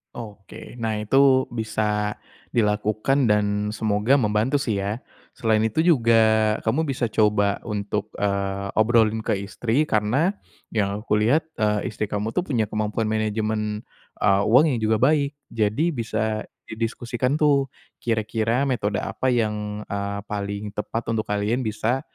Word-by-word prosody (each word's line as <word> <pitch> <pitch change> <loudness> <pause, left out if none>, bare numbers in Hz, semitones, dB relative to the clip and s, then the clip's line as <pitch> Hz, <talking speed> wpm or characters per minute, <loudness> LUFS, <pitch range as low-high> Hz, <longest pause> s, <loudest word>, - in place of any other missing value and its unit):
Oke. 110 +1 -10
Nah, 110 -2 -2
itu 135 +3 +4
bisa 105 -2 -1 0.4
dilakukan 110 +4 +1
dan 105 -1 +3 0.3
semoga 110 +4 +2
membantu 110 +1 +1
sih 115 -8 0
ya. 100 +5 -3 0.3
Selain 110 -2 +2
itu 110 +8 +1
juga, 120 -10 +4 0.5
kamu 145 +8 +1
bisa 130 -3 -1
coba 105 -2 +2
untuk, 105 -1 -3
eee, 100 -1 -1
obrolin 110 0 +3
ke 110 -1 0
istri. 115 +7 0
Karena, 125 - +1 0.4
yang 100 -2 0
aku 105 -2 +1
lihat, 125 +10 +3 0.2
eee, 105 +2 0
istri 105 0 -3
kamu 105 +2 -2
tuh - - +1
punya 115 -6 +1
kemampuan 110 +1 -1
manajemen, 110 0 -1 0.3
eee, 100 -1 +3
uang 125 +8 +6
yang 120 - -1
juga 110 0 +2
baik. 140 +3 +2 0.2
Jadi 115 +10 +1
bisa 110 -3 -2 0.3
didiskusikan 120 +4 -2
tuh, 140 -3 +3 0.3
kira-kira 115 +2 0
metode 105 -6 -1
apa 130 - -2
yang, 105 -3 -1
eee, 100 0 -3
paling 100 0 -4
tepat 115 +2 -3
untuk 110 -1 -2
kalian 105 +4 0
bisa 115 +3 -1
110 Hz, 140 wpm, -23 LUFS, 105-120 Hz, 0.5 s, uang